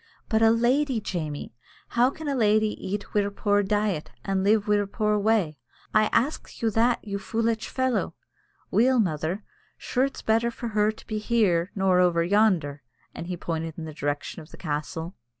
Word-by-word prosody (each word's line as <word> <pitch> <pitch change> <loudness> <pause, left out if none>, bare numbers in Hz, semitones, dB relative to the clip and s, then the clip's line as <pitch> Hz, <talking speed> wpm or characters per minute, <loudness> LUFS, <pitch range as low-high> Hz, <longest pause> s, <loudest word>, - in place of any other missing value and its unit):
"But 220 0 +2
a 225 - +6
lady, 245 +3 +2
Jamie! 155 - -4 0.4
How 240 +2 +3
can 310 +2 -8
a 285 - 0
lady 215 -3 +3
eat 200 +2 -4
we'er 205 -1 +2
poor 205 0 +1
diet, 205 -5 -1 0.2
and 195 -1 0
live 210 +1 +4
in - - -19
we'er 205 -1 +2
poor 210 +1 0
way? 200 -9 +1 0.3
I 215 0 +5
ax 280 +6 -1
you 225 - +2
that, 230 +3 +2
you 200 0 -3
foolitch 225 +2 -1
fellow?" 260 -1 -1 0.6
"Weel, 250 +5 +4
mother, 175 +1 -1 0.3
sure 255 +1 0
it's 275 - -6
better 225 +2 +2
for 235 0 -5
her 210 0 +2
to 220 - -16
be 215 -1 -3
here 200 -6 +1
nor 190 -2 +3
over 175 -2 +3
yonder," 175 -7 +2 0.3
and 170 - -7
he 180 -1 -4
pointed 165 -2 -4
in 165 - -5
the 155 - -7
direction 145 +3 -3
of 155 - -14
the - - -13
castle. 160 +2 -4
210 Hz, 185 wpm, -26 LUFS, 175-225 Hz, 0.6 s, a